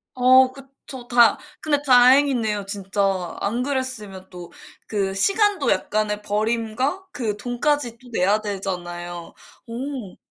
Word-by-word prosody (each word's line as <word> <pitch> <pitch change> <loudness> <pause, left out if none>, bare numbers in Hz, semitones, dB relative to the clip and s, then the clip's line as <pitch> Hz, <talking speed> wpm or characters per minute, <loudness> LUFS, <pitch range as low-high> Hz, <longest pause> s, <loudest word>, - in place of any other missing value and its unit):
어 255 +1 +5
그쵸. 270 -2 -12
다 240 -1 +5 0.2
근데 290 -2 0
다행이네요, 250 -5 +4
진짜. 195 -2 -2
안 230 +5 -1
그랬으면 255 -9 -4
또 175 -2 -11 0.4
그 195 -2 -1
시간도 395 - +1
약간의 210 0 0
버림과 230 - -2
그 230 - -3
돈까지 245 +2 -1
또 250 +1 -18
내야 200 +2 +2
되잖아요. 175 -4 -6 0.3
어. 245 -4 -6
230 Hz, 240 characters per minute, -22 LUFS, 200-260 Hz, 0.4 s, 어